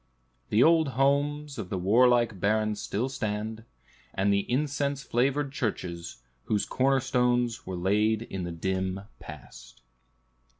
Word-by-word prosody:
The 110 +4 +4
old 160 -1 +5
homes 145 0 +1
of 95 -5 -5
the 95 - -2
warlike 120 +2 +3
barons 105 +1 0
still 115 +6 -2
stand, 110 -2 -4 0.5
and 100 +1 +2
the 100 +4 -1
incense 140 0 -1
flavored 135 +3 0
churches, 85 - -4 0.2
whose 105 -2 0
corner 135 +1 +2
stones 125 -3 0
were 95 -1 -4
laid 105 +5 +1
in 95 -5 -5
the 85 - -4
dim 95 +2 -2 0.2
past. 60 0 -12
110 Hz, 130 wpm, -28 LUFS, 95-135 Hz, 0.5 s, old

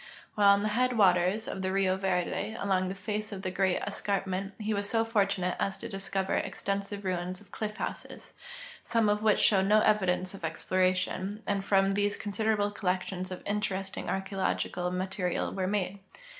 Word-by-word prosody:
While 205 -1 +4
on 200 +1 +1
the 215 - +1
headwaters 210 -4 +3
of 190 - -4
the 190 0 -1
Rio 190 -1 +2
Verde, 190 +3 -1
along 185 -2 +1
the 190 - -4
face 210 +2 -3
of 195 -1 -6
the 185 - -2
great 190 -1 +1
escar]) 200 -1 -1
ment, 195 +1 -3
he 215 0 -1
Avas 200 0 -1
so 225 +2 +1
fortunate 200 -5 +1
as 195 - -1
to - - -6
discover 195 -1 -2
extensive 200 0 -2
ruins 180 0 -2
of 205 - -19
clitf 215 -1 -4
bouses, - - -6 0.5
some 230 -3 +2
of 210 0 +2
Avhich 215 -1 +4
shoAved 195 -2 +4
no 215 +1 +5
evidence 185 -3 +2
of 195 - -10
exploration, 185 +5 0
and 200 -1 0
from 195 0 +3
these 205 +1 +1
considerable 205 0 0
collections 185 -2 -2
of 185 - -7
interesting 195 -2 -2
archeologic 195 0 -1
ma 180 +1 -1
terial 185 -2 -2
Avere 185 -1 -1
made. 200 -1 -1
195 Hz, 175 wpm, -30 LUFS, 185-205 Hz, 0.5 s, no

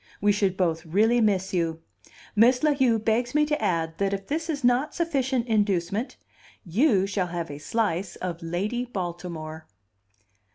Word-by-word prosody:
We 205 +1 +3
should 195 -2 +1
both 165 -3 0
really 220 +8 +3
miss 195 -3 +1
you. 165 -2 0 0.6
Miss 245 +5 +5
La 305 -1 +4
Heu 260 -5 +3
begs 230 +4 0
me 300 0 +4
to 300 0 -1
add 165 -2 -1
that 200 0 +1
if 195 0 -4
this 320 +3 -3
is 290 -3 -2
not 250 +5 +2
sufficient 265 -7 0
inducement, 205 0 0 0.5
you 195 - +3
shall 195 -2 -1
have 170 -3 -4
a 145 - -7
slice 185 0 -1
of 175 -2 -5
Lady 195 +9 -2
Baltimore." 175 -7 -6
200 Hz, 160 wpm, -26 LUFS, 175-245 Hz, 0.6 s, Miss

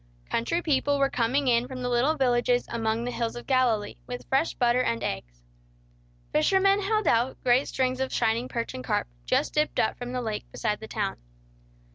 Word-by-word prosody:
Country 335 +9 0
people 285 -1 +2
were 275 0 +2
coming 260 +4 +1
in 240 0 +3
from 255 -1 -6
the - - -1
little 245 +6 +2
villages 245 -2 +2
among 225 0 -1
the 245 - -3
hills 235 -1 -2
of 240 - -8
Galilee, 240 -6 +1
with 245 0 -6
fresh 270 +5 +1
butter 245 0 +3
and 115 - -1
eggs. - - -5 0.9
Fishermen 390 - +3
held 430 +2 0
out 240 +3 +2
great 250 +2 +3
strings 255 -1 -1
of 265 0 -1
shining 230 +3 +1
perch 235 -1 -3
and 125 - -6
carp, - - 0 0.2
just - - +1
dipped 300 0 +1
up 220 - +1
from 245 0 -5
the 250 0 -2
lake 215 -2 -4
beside 210 0 -2
the 220 - -8
town. - - -2
245 Hz, 190 wpm, -27 LUFS, 230-270 Hz, 0.9 s, in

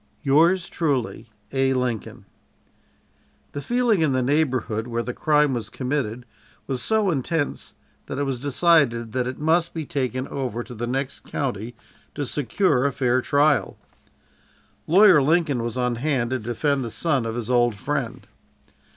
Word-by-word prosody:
"Yours 165 +6 +3
truly, 135 -8 -2 0.2
"A. 135 0 +2
LINCOLN." 125 -4 -3 1.3
The 145 - -5
feeling 240 - +1
in 150 -4 +2
the 130 -1 +1
neighborhood 130 -6 0
where 120 0 -2
the 125 - -4
crime 150 -1 +2
was 115 -3 -4
committed 125 -2 -3 0.4
was 130 -2 -3
so 215 -3 +1
intense 145 +1 -2 0.3
that - - -5
it 145 - 0
was 135 -3 -2
decided 140 -5 +2
that 125 +1 -1
it 130 - -5
must 165 +3 +1
be 160 -2 -3
taken 130 -1 -2
over 125 -4 -3
to 125 - -10
the 120 +1 -4
next 135 +2 -2
county 120 -3 -4 0.4
to 145 - -2
secure 145 +1 +1
a - - -1
fair 130 -1 +1
trial. 145 +3 +2 1.1
Lawyer 185 -2 +7
Lincoln 150 -3 +2
was 120 +1 -3
on 125 -1 0
hand 130 -3 -1
to 130 - 0
defend 130 +5 -1
the 115 - -4
son 140 +1 0
of 115 0 -4
his 120 0 -3
old 120 -2 +3
friend. 100 - -3
135 Hz, 155 wpm, -23 LUFS, 120-150 Hz, 1.3 s, Lawyer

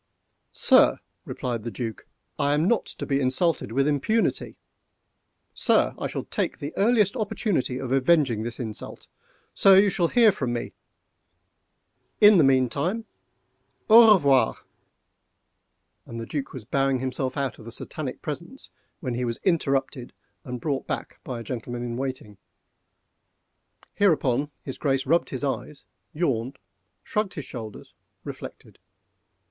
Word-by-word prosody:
"Sir!" - - +4 0.3
replied 120 -3 -4
the 115 - -5
Duc, 115 -3 -6 0.3
"I 145 +1 +2
am 155 +4 +1
not 235 +1 +1
to - - -7
be 140 -1 0
insulted 130 - +1
with 135 +4 +1
impunity!—Sir! 150 +11 -2
I - - -4
shall - - -5
take - - -3
the 145 -1 -6
earliest 210 -1 +3
opportunity 205 - -1
of 130 -1 -5
avenging 135 -4 +3
this 120 +2 -6
insult!—Sir! 125 - 0
you 200 0 +5
shall 175 -2 +1
hear 230 +2 +5
from 130 -9 -3
me! 120 - -4 1.5
in 210 -3 +7
the - - +6
meantime 140 - +1 0.9
au 225 -1 +9
revoir!"—and 135 -5 -4
the 115 - -5
Duc 135 +1 -4
was 125 -5 -9
bowing 135 +2 +1
himself 130 +1 -3
out 135 -3 -2
of 110 - -13
the 115 - -8
Satanic - - -6
presence, - - -7 0.3
when 125 - -3
he 125 +1 -2
was 115 -1 -2
interrupted 135 -8 0 0.3
and 125 -1 -6
brought 135 +1 -3
back - - -5
by 125 -3 -5
a - - -7
gentleman 120 +1 -5
in 120 -1 -4
waiting. 125 -6 -5 1.5
Hereupon 145 -8 +2
his 135 - -7
Grace 135 -2 0
rubbed 165 +5 +2
his 130 0 -4
eyes, 140 +1 -4 0.3
yawned, 135 -5 -2 0.5
shrugged 210 -2 -2
his 150 - -6
shoulders, 110 -4 -9 0.3
reflected. - - -10
135 Hz, 130 wpm, -25 LUFS, 125-170 Hz, 1.5 s, au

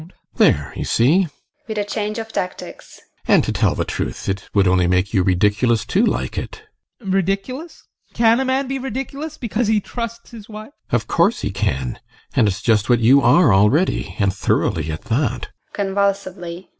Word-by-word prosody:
GUSTAV. 160 - -13 0.3
There, 70 -2 +3
you - - -3
see! 165 +11 +3 0.4
[With 220 -1 -5
a 205 - +1
change 210 +1 -3
of 225 -1 -6
tactics] 180 - -6 0.3
And - - +5
to - - -2
tell - - +1
the - - -1
truth, - - -4
it 95 0 -3
would 100 -2 +3
only 90 -1 +3
make 90 +3 +1
you 95 - +3
ridiculous 105 +5 +2
to 190 - +1
like 235 - -1
it. 435 - -8 0.4
ADOLPH. 195 -4 -3
Ridiculous? 195 - -2 0.3
Can 230 +1 +4
a 265 - 0
man 260 +1 0
be 270 +1 -3
ridiculous 270 +4 -5
because 235 -2 -2
he 215 0 +3
trusts 230 +2 -7
his 225 -2 -11
wife? 215 +3 -9 0.2
GUSTAV. - - +1
Of 110 -2 -1
course 175 +7 +2
he 100 - -2
can. 65 -10 -2 0.4
And 110 - +4
it's 100 0 -3
just 110 0 +2
what 120 - +5
you 130 +5 +5
are 150 - +5
already 105 - +2
and 100 -2 +1
thoroughly 80 -5 0
at 75 - -6
that! 120 0 -1
170 Hz, 180 wpm, -20 LUFS, -, 0.4 s, And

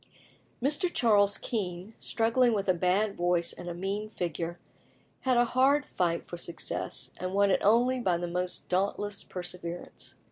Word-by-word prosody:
Mr. 300 +6 +1
Charles 205 - +4
Kean, 190 -2 -4
struggling 230 +1 +2
with 200 -1 -1
a 185 - +5
bad 190 +4 +1
voice 175 -1 +1
and 175 - -7
a - - -3
mean 200 +4 -3
figure, 170 -3 -3 0.6
had 255 -2 +2
a 240 - +5
hard 270 +4 +3
fight 170 -2 -1
for 175 - -6
success, 170 0 -4
and 185 +1 -3
won 200 0 +4
it - - +2
only 245 +5 +4
by 185 -7 +1
the 175 - -3
most 180 +1 -3
dauntless 200 +2 -1
perseverance. 175 - -6
195 Hz, 155 wpm, -29 LUFS, 175-225 Hz, 0.6 s, a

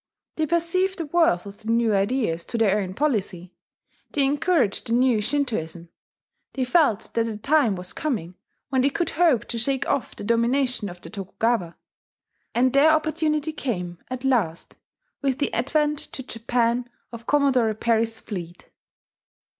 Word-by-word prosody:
They 315 -1 0
perceived 340 +3 +1
the 335 - -3
worth 290 - +2
of 200 +1 -10
the 220 - -13
new 230 -1 +3
ideas 200 -4 0
to 235 - -3
their 210 -2 +3
own 185 -2 -4
policy; 195 - -1 0.6
they 280 -2 +2
encouraged 285 - +1
the 230 - 0
new 245 -3 +3
Shintoism; 180 - -2 0.6
they 265 - -1
felt 250 - +2
that 230 0 +1
a 220 -2 -4
time 275 -2 +2
was 180 0 -7
coming 215 - -3 0.4
when 260 -1 +2
they 275 - +3
could 340 +5 -1
hope 310 -9 +3
to 235 - -2
shake 265 +3 0
off 275 - -1
the - - -8
domination 235 0 +1
of 175 0 -11
the - - -10
Tokugawa. 195 -2 -1 0.8
And 255 +1 +3
their 280 +3 +6
opportunity 310 -1 +1
came 180 - -4
at 255 +1 -5
last 205 -11 0 0.5
with 270 -2 0
the 285 - -1
advent 295 +4 +1
to 265 - -6
Japan 235 +1 -1 0.2
of 230 -1 -10
Commodore 270 -6 +3
Perry's 225 0 0
fleet. 175 -4 -8
240 Hz, 155 wpm, -24 LUFS, 210-285 Hz, 0.8 s, their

